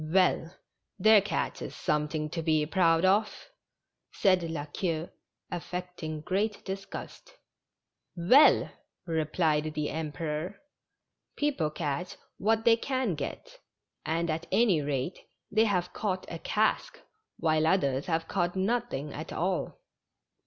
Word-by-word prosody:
W 155 +5 0
ell, 180 -2 +3 0.5
their 215 +1 +7
catch 190 -4 -2
is - - -6
something 150 +1 -1
to 165 - -2
be 155 -2 +2
proud 165 0 +3
of," 210 - +1 0.6
said 185 -2 +3
La 165 -3 -4
Queue, 165 +1 -3 0.4
affecting 175 -3 -5
great 200 +6 -1
disgust. 195 - -7 0.8
''Well!" 225 - +6 0.3
replied 155 -1 0
the 150 -1 -1
Emperor, 160 +3 -4 0.8
"people 280 - 0
catch 150 +2 -3 0.2
what 220 +2 +1
they 230 -1 +6
can 255 -4 -1
get, - - -6 0.4
and 165 +1 0
at 160 +2 -4
any 205 -10 +4
rate 140 +4 -2 0.3
they 215 +2 +4
have 180 -4 0
caught 190 -3 -2
a - - -5
cask, - - 0 0.4
while 155 -1 +2
others 140 -7 +1
have 165 -1 0
caught 175 +1 -1
nothing 190 - -1
at 155 - -7
all." 180 +1 -2
170 Hz, 125 wpm, -29 LUFS, 155-195 Hz, 0.8 s, their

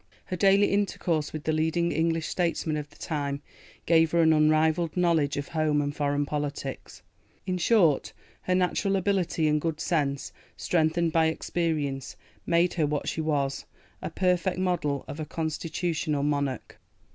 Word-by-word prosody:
Her 185 - -4
daily 195 +3 +4
intercourse 175 -6 0
with 155 -1 -6
the 155 - 0
leading 160 +2 +1
English 165 0 0
statesmen 170 -3 -1
of 150 -1 -4
the 145 - -21
time 145 -2 -3 0.4
gave 165 -1 +4
her 170 -1 +4
an 160 0 +5
unrivalled 155 +2 +2
knowledge 165 -6 +2
of 145 - -4
home 155 -2 +1
and 145 0 -2
foreign 145 0 0
politics. 145 -2 -5 0.4
In 185 -1 -2
short, 170 - +3 0.3
her 185 - 0
natural 185 +2 +1
ability 185 -4 +1
and 150 0 +2
good 160 -1 -2
sense, 140 -5 -1 0.3
strengthened 165 0 +1
by 160 -1 +4
experience, 155 -4 -2 0.3
made 170 +1 +3
her 155 -3 +1
what 150 0 -2
she 160 - -2
was, 145 -3 -1 0.4
a - - -4
perfect 180 -1 0
model 175 -7 -1
of 150 - -7
a 155 - -3
constitutional 160 -1 -2
monarch. 140 -3 -2
160 Hz, 155 wpm, -27 LUFS, 150-170 Hz, 0.4 s, an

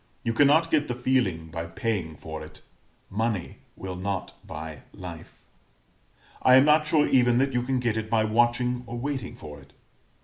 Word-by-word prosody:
You 115 - 0
cannot 145 +6 +4
get 150 -2 +2
the 125 - -2
feeling 120 -11 0
by 85 0 -4
paying 90 -4 -3
for 80 +1 -7
it 75 - -13 0.5
money 110 -2 -2 0.2
will 95 -1 -6
not 95 0 -3
buy 80 -1 -7
life. 85 -3 -10 1.0
I 130 - +6
am 130 +2 +7
not 150 0 +4
sure 150 -1 +3
even 125 -2 +4
that 135 +1 +2
you 125 - +1
can 130 +1 -1
get 120 -3 0
it 110 0 -3
by 110 -1 +3
watching 120 +3 +1
or 120 +1 -5
waiting 135 -1 -4
for 75 -1 -10
it. 70 0 -19
115 Hz, 175 wpm, -26 LUFS, 90-130 Hz, 1.0 s, am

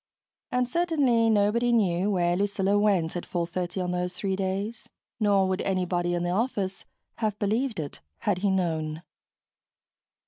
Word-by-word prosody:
And 250 0 +1
certainly 270 -7 +2
nobody 220 +3 +3
knew 195 -4 +2
where 175 -3 +2
Lucilla 200 0 +1
went 190 -6 +2
at 175 - -3
4:30 175 +1 -2
on 180 - -2
those 180 0 -2
three 190 +1 -1
days 195 +4 -3 0.3
nor 200 -3 +3
would 185 0 -1
anybody 180 -2 0
in 175 - -1
the 175 - 0
office 195 -2 -1 0.3
have 215 -2 -1
believed 220 +2 0
it, 145 -3 -6 0.2
had 200 -3 +1
he 200 +1 +1
known. 160 -4 -1
195 Hz, 145 wpm, -27 LUFS, 180-215 Hz, 0.3 s, nobody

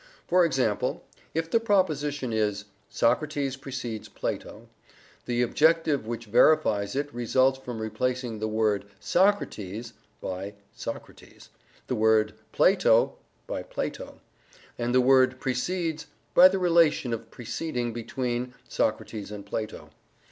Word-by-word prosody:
For 180 +1 +4
example, 125 -9 0 0.3
if 165 0 -1
the 230 - +4
proposition 150 - 0
is 105 -2 0 0.2
"Socrates 140 +3 0
precedes 130 -5 -6
Plato," - - -5 0.6
the 120 0 +1
objective 155 -1 +2
which 115 0 -4
verifies 105 -3 +3
it 145 +1 -2
results 130 +2 +2
from 125 -3 -6
replacing 115 +1 -2
the 110 - -1
word 110 -2 +1
"Socrates" 120 - 0 0.3
by 95 +2 -5 0.2
Socrates, - - -9 0.4
the - - -3
word 110 -1 +3 0.2
"Plato" - - +3 0.3
by - - -4
Plato, - - -5 0.6
and 120 +1 -1
the 130 - +6
word 130 0 +4
"precedes" 160 +4 -2 0.3
by 185 - +9
the 190 +1 0
relation 165 -8 +3
of 115 0 -5
preceding 120 0 -4
between 120 +1 -3
Socrates 105 -3 -2
and 105 -1 -8
Plato. 110 +1 -5
125 Hz, 120 wpm, -27 LUFS, 110-150 Hz, 0.6 s, by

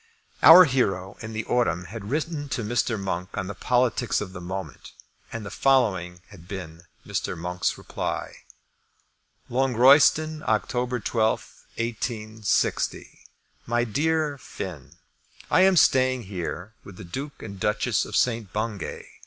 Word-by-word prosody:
Our 180 +3 +10
hero 95 - 0
in 110 -1 -7
the 110 0 -3
autumn 90 -8 0
had 100 +2 -8
written 150 0 -2
to 120 - -2
Mr. 115 0 0
Monk 95 -1 -4
on 95 - -2
the 100 - -5
politics 125 +2 +1
of 95 -3 -6
the 90 - -8
moment, 90 -5 -7 0.4
and 115 -2 -6
the - - -7
following 95 -10 +1
had 90 -5 -15
been 85 -3 -8 0.2
Mr. - - -3
Monk's 90 +2 -2
reply: - - -4 1.1
Longroyston, 135 +5 +4
October 125 +3 0
12, 110 -1 -1
186. 110 -2 -1 0.7
MY 120 0 +1
DEAR 150 +5 0
FINN, 85 - -8 0.6
I - - +5
am 190 -1 +5
staying 130 -3 +4
here 95 +1 -6
with 95 -3 -12
the - - -9
Duke 135 +11 -7
and 100 -3 -8
Duchess 105 +3 +1
of - - -6
St. 115 -6 +1
Bungay. 105 -3 -4
110 Hz, 135 wpm, -25 LUFS, 95-130 Hz, 1.1 s, Our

